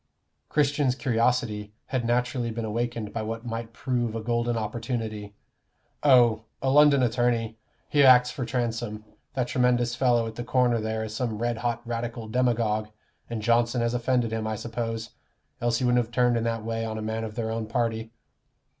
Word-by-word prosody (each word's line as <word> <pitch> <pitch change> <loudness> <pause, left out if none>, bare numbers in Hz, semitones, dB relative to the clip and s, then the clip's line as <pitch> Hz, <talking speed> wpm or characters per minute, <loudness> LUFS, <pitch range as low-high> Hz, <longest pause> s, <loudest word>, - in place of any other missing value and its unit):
Christian's 145 -3 +2
curiosity 115 -5 0
had 130 -2 -2
naturally 125 0 0
been 115 0 -4
awakened 115 -1 -3
by 115 - -2
what 115 +2 -5
might 115 -1 -4
prove 120 -2 -2
a - - -1
golden 120 0 0
opportunity. 110 -2 -4 0.7
"Oh 120 -6 +5
a 135 - 0
London 145 -2 +6
attorney. 115 -2 0 0.3
He 145 - +3
acts 125 -1 +7
for 130 - -4
Transome. 115 -3 -3 0.3
That 125 -2 0
tremendous 125 -1 +2
fellow 120 -2 +2
at 110 - -5
the 120 - -5
corner 120 -2 +2
there 110 0 -2
is 110 -1 -6
some 115 -3 -2
red 120 +1 -1
hot 120 -1 -2
Radical 115 -1 -4
demagogue, 110 -3 +1 0.4
and 115 -2 -4
Johnson 120 +1 +2
has 115 0 0
offended 120 -1 +1
him, 110 -1 -2
I 110 - -1
suppose; 115 0 -4 0.5
else 120 -1 +1
he 125 - -1
wouldn't 120 0 +3
have 115 - -14
turned 125 0 +3
in 115 0 0
that 115 -1 -2
way 115 0 -2
on 110 -1 -3
a 110 - -4
man 110 +1 -2
of 110 -1 -6
their 110 -2 -2
own 110 -1 -3
party." 115 -1 -1
115 Hz, 180 wpm, -26 LUFS, 110-125 Hz, 0.7 s, acts